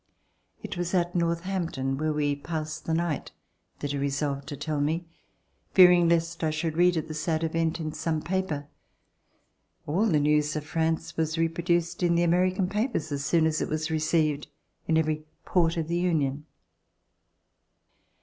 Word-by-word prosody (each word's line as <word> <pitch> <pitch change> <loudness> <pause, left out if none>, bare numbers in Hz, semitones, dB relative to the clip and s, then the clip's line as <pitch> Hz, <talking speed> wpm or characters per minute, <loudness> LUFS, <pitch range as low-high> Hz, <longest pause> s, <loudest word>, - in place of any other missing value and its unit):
It - - -5
was 175 +1 -1
at 175 -1 +1
Northampton, 170 -5 -1
where 155 +3 -1
we 145 -1 0
passed 155 +1 -5
the 160 - -1
night, 165 -3 -2 0.5
that 145 - -2
he 140 - -2
resolved 140 0 -2
to 145 - -6
tell 150 0 -2
me, 160 +4 0 0.7
fearing 180 -2 +7
lest 165 0 0
I 160 - +2
should 155 +1 -2
read 175 0 +4
of 160 - -2
the 155 - -5
sad 160 +1 -1
event 165 +1 0
in 155 -1 -3
some 160 0 -1
paper. 170 -4 -2 1.2
All 185 +10 +1
the 160 -7 +3
news 150 +1 +2
of 155 - -2
France 160 +1 -1
was 160 0 0
reproduced 170 +1 0
in 175 -1 +3
the 170 - +3
American 180 +2 +2
papers 210 - -1
as 140 -1 -2
soon 165 +1 +3
as 155 -1 +1
it - - -2
was 155 +1 -2
received 155 -2 +1 0.4
in 160 - +3
every 155 -1 0 0.2
port 170 -1 +2
of 160 -2 -1
the 170 +1 0
Union. 150 -5 0
160 Hz, 165 wpm, -27 LUFS, 150-175 Hz, 1.2 s, fearing